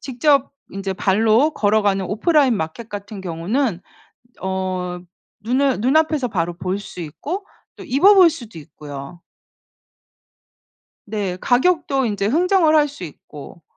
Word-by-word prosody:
직접 275 Hz, +2 st, +1 dB, 0.2 s
인제 195 Hz, 0 st, -4 dB
발로 220 Hz, +9 st, +2 dB
걸어가는 205 Hz, -2 st, +1 dB
오프라인 265 Hz, -, +2 dB
마켓 160 Hz, +8 st, -5 dB
같은 205 Hz, -1 st, -7 dB
경우는 185 Hz, +5 st, -2 dB, 0.6 s
어 185 Hz, -1 st, -3 dB, 0.4 s
눈을 255 Hz, +2 st, +1 dB
눈앞에서 300 Hz, 0 st, +2 dB
바로 175 Hz, -5 st, -2 dB
볼 185 Hz, +1 st, -2 dB
수 195 Hz, -, -10 dB
있고 305 Hz, -, -5 dB, 0.3 s
또 -, -, -9 dB
입어 370 Hz, +11 st, +5 dB
볼 365 Hz, -3 st, +7 dB
수도 235 Hz, -, -9 dB
있고요. 145 Hz, +1 st, -10 dB, 1.8 s
네. 200 Hz, -4 st, -3 dB
가격도 275 Hz, 0 st, +2 dB
인제 205 Hz, -2 st, -1 dB
흥정을 330 Hz, -, +3 dB
할 295 Hz, -1 st, +4 dB
수 280 Hz, -10 st, -9 dB
있고 150 Hz, +1 st, -12 dB
215 Hz, 245 characters per minute, -20 LUFS, 185-280 Hz, 1.8 s, 볼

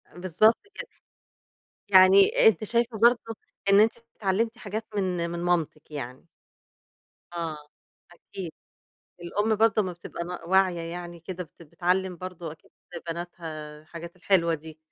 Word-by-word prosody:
بالضبط 185 Hz, +5 st, +3 dB, 0.2 s
كده. -, -, -6 dB, 1.0 s
يعني 190 Hz, +2 st, +7 dB
أنتِ 215 Hz, -1 st, +4 dB
شايفة 235 Hz, +1 st, 0 dB
برضو 235 Hz, -1 st, +4 dB, 0.4 s
إن 200 Hz, +1 st, +7 dB
أنتِ 220 Hz, +1 st, +6 dB, 0.3 s
اتعلمتِ 220 Hz, +4 st, 0 dB
حاجات 220 Hz, -1 st, -5 dB
من 180 Hz, -3 st, 0 dB
من 170 Hz, 0 st, -4 dB
مامتِك 160 Hz, -3 st, -1 dB
يعني؟ 130 Hz, +1 st, -6 dB, 1.1 s
آه، 165 Hz, -3 st, -3 dB, 0.5 s
أكيد، 175 Hz, 0 st, -8 dB, 0.7 s
الأم 205 Hz, +5 st, 0 dB
برضو 220 Hz, 0 st, +4 dB
أما 185 Hz, -2 st, -3 dB
بتبقى 170 Hz, 0 st, -7 dB
ن 175 Hz, -1 st, -7 dB
واعية 190 Hz, -2 st, +3 dB
يعني 170 Hz, 0 st, -7 dB
كده 180 Hz, +2 st, -6 dB
بت 165 Hz, -, -20 dB
بتعلم 180 Hz, +3 st, 0 dB
برضو 175 Hz, -3 st, -6 dB
أكيد 155 Hz, -, -17 dB, 0.4 s
بناتها 160 Hz, -3 st, -6 dB
الحاجات 170 Hz, +2 st, -10 dB
الحلوة 175 Hz, -3 st, +2 dB
دي. 160 Hz, 0 st, -7 dB
180 Hz, 130 wpm, -27 LUFS, 170-200 Hz, 1.1 s, يعني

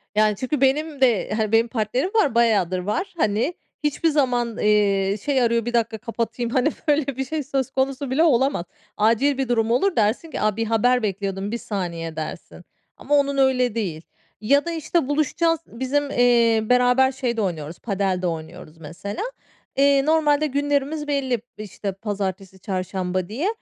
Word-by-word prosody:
Yani, 215 Hz, -1 st, +3 dB
çünkü 255 Hz, +5 st, -3 dB
benim 290 Hz, +2 st, +1 dB
de, 235 Hz, -7 st, +2 dB
hani, 215 Hz, -1 st, 0 dB
benim 225 Hz, +1 st, +4 dB
partnerim 245 Hz, -, -1 dB
var, 290 Hz, -, +3 dB
bayağıdır 205 Hz, -6 st, +2 dB
var. 210 Hz, -, -3 dB
Hani, 220 Hz, -, +1 dB, 0.3 s
hiçbir 300 Hz, +3 st, +1 dB
zaman, 245 Hz, -6 st, 0 dB
eee, 200 Hz, -2 st, +2 dB
"Şey 275 Hz, -3 st, +2 dB
arıyor, 235 Hz, -1 st, +1 dB
bir 240 Hz, -, -3 dB
dakika 225 Hz, -1 st, 0 dB
kapatayım." 230 Hz, +1 st, -3 dB
hani, 260 Hz, +4 st, +2 dB, 0.2 s
böyle 295 Hz, -1 st, +2 dB
bir 265 Hz, -, -1 dB
şey 305 Hz, +2 st, -3 dB
söz 270 Hz, -1 st, -2 dB
konusu 270 Hz, 0 st, -1 dB
bile 310 Hz, +5 st, +3 dB
olamaz. 265 Hz, -, +2 dB, 0.3 s
Acil 235 Hz, +6 st, +2 dB
bir 265 Hz, -2 st, -2 dB
durum 225 Hz, -1 st, +1 dB
olur 380 Hz, +10 st, +2 dB
dersin 225 Hz, +9 st, 0 dB
ki, -, -, -4 dB
"A, 215 Hz, -1 st, +1 dB
bir 225 Hz, -, 0 dB
haber 230 Hz, +2 st, +2 dB
bekliyordum, 195 Hz, 0 st, -3 dB
1 235 Hz, -, -2 dB
saniye," 170 Hz, -7 st, -4 dB
dersin. 155 Hz, -1 st, -7 dB, 0.3 s
Ama 290 Hz, -, 0 dB
onun 280 Hz, -1 st, +2 dB
öyle 255 Hz, -3 st, +2 dB
değil 180 Hz, -9 st, -3 dB, 0.4 s
ya 280 Hz, +8 st, +3 dB
da, 340 Hz, -, -2 dB
işte, 320 Hz, -2 st, -1 dB
buluşacağız, 315 Hz, +3 st, +1 dB
bizim, 275 Hz, +4 st, -2 dB
eee, 235 Hz, -2 st, +4 dB
beraber 250 Hz, +3 st, +3 dB
şey 250 Hz, -3 st, -3 dB
de -, -, +1 dB
oynuyoruz, 165 Hz, -4 st, -4 dB
padel 195 Hz, -4 st, -1 dB
de 180 Hz, -, 0 dB
oynuyoruz, 165 Hz, 0 st, -7 dB
mesela. 170 Hz, -, -6 dB, 0.5 s
Eee, 275 Hz, 0 st, +4 dB
normalde 305 Hz, -1 st, +3 dB
günlerimiz 290 Hz, +2 st, -1 dB
belli, 265 Hz, -5 st, 0 dB, 0.2 s
işte, 205 Hz, -1 st, -5 dB
pazartesi, 195 Hz, -2 st, -5 dB
çarşamba 185 Hz, -1 st, -3 dB
diye. 275 Hz, -, -2 dB
235 Hz, 170 wpm, -23 LUFS, 205-275 Hz, 0.5 s, benim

